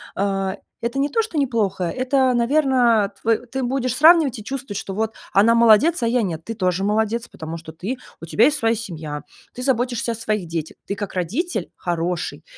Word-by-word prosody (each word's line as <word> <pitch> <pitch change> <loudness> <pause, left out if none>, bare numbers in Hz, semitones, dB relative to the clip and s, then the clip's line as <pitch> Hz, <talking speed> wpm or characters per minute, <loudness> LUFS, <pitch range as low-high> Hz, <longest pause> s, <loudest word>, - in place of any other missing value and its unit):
а, 195 0 -1 0.2
это 235 +3 -2
не 280 - +2
то, 455 - +2
что 390 -8 -5
неплохо. 215 -9 0
Это, 255 +6 +1
наверно, 240 -4 +3
тв 230 +3 0
ты 265 0 -2
будешь 255 -1 -1
сравнивать 310 -4 +5
и - - -9
чувствовать, 250 -4 -5
что 195 - -6
вот 220 +1 -1 0.2
она 220 +4 +5
молодец, 235 +7 +5
а - - +2
я 245 +1 +2
нет. 165 -5 -3
Ты 225 - -5
тоже 185 -2 0
молодец, 220 +3 0
потому 160 +1 -7
что 160 -1 -10
ты, 190 +10 -4 0.3
у - - -6
тебя 205 +7 +2
есть 300 +2 +3
своя 225 -2 +2
семья, 160 -9 -6 0.3
ты 250 - -6
заботишься 245 -2 0
о - - -5
своих 215 -4 -2
детях, 160 -1 -4
ты 200 - -2
как 205 -1 -5
родитель 230 - -2
хороший. 175 0 -3
225 Hz, 195 wpm, -22 LUFS, 195-255 Hz, 0.3 s, сравнивать